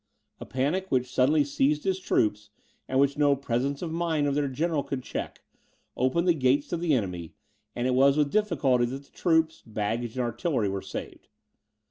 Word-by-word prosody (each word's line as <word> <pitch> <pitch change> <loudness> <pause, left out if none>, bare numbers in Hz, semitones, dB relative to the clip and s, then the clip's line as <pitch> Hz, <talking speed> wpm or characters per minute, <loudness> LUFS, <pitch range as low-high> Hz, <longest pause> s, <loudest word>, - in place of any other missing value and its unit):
A - - -8
panic 155 +9 -1
which 125 -1 0
suddenly 145 +4 +4
seized 145 +1 +1
his 190 -1 0
troops, 105 - 0 0.4
and 130 - +1
which 140 +1 +2
no 145 -1 +4
presence 135 +3 -2
of 165 - -3
mind 165 -3 0
of 140 - +1
their 145 0 0
general 150 +3 -1
could 135 -2 -5
check, - - -6 0.5
opened 130 +8 +1
the 175 - +6
gates 140 -1 +2
to 175 - -1
the 165 -3 +1
enemy, 90 -7 -4 0.4
and 120 - -2
it 130 - +2
was 135 +2 +4
with 145 -2 +2
difficulty 145 -12 +2
that 135 +3 -5
the 140 - -26
troops, 160 -2 +1
baggage, 110 +2 -3
and 130 - 0
artillery, 120 - -1
were 95 0 -3
saved. 95 - -8
140 Hz, 185 wpm, -27 LUFS, 125-155 Hz, 0.5 s, the